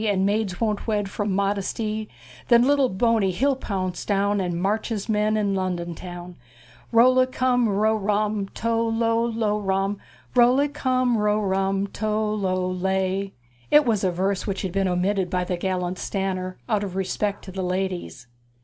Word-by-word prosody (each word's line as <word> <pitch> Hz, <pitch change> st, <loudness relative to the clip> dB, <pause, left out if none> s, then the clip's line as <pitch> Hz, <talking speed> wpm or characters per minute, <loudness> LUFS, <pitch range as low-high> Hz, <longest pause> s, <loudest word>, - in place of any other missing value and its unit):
And 200 Hz, -3 st, +1 dB
maids' 200 Hz, -2 st, 0 dB
won't 215 Hz, -2 st, -1 dB
wed' 205 Hz, -3 st, -1 dB
from 205 Hz, 0 st, -2 dB
mod' 200 Hz, +1 st, +1 dB
es 195 Hz, -, -3 dB
ty', 215 Hz, -1 st, -3 dB, 0.4 s
Then 235 Hz, 0 st, +6 dB
lit' 285 Hz, +3 st, +3 dB
tle 265 Hz, -3 st, +3 dB
Bo' 230 Hz, +4 st, +2 dB
ney 195 Hz, -2 st, +2 dB
he'll 265 Hz, +10 st, +1 dB
pounce 185 Hz, -7 st, -3 dB
down', 200 Hz, 0 st, +1 dB
And 175 Hz, -2 st, -2 dB
march' 205 Hz, +5 st, 0 dB
his 215 Hz, -4 st, -3 dB
men' 215 Hz, 0 st, +1 dB
on 205 Hz, -2 st, +1 dB
Lon' 185 Hz, -1 st, -1 dB
don 170 Hz, 0 st, -5 dB
town'! 175 Hz, 0 st, -9 dB, 0.5 s
Chorus. -, -, -28 dB
Rol' 245 Hz, +2 st, +6 dB
li 255 Hz, -, +6 dB
cum 255 Hz, -2 st, +1 dB
ro' 215 Hz, +2 st, +2 dB
rum, 210 Hz, -1 st, 0 dB
tol' 230 Hz, 0 st, 0 dB
lol 230 Hz, +1 st, +1 dB
lo' 215 Hz, -2 st, 0 dB
rum, 195 Hz, 0 st, -1 dB, 0.3 s
Rol' 245 Hz, 0 st, +5 dB
li 285 Hz, +2 st, +2 dB
cum 255 Hz, -4 st, +1 dB
ro' 210 Hz, 0 st, +2 dB
rum, 195 Hz, -1 st, 0 dB
tol' 215 Hz, +1 st, -1 dB
lol 185 Hz, -2 st, -1 dB
lay. 190 Hz, +1 st, -1 dB, 0.4 s
It 295 Hz, 0 st, +6 dB
was 220 Hz, -4 st, +1 dB
a 185 Hz, -, +3 dB
verse 190 Hz, +3 st, -1 dB
which 195 Hz, -1 st, -2 dB
had 190 Hz, -, -2 dB
been 195 Hz, +1 st, 0 dB
omitted 185 Hz, +1 st, 0 dB
by 180 Hz, 0 st, 0 dB
the 180 Hz, 0 st, -2 dB
gallant 180 Hz, 0 st, -2 dB
Stanner, 185 Hz, -2 st, -3 dB
out 215 Hz, -4 st, +1 dB
of 190 Hz, -2 st, -5 dB
respect 195 Hz, +2 st, -2 dB
to 190 Hz, -, -8 dB
the 190 Hz, +1 st, -4 dB
ladies. 180 Hz, -8 st, -3 dB
200 Hz, 195 wpm, -24 LUFS, 190-220 Hz, 0.5 s, Then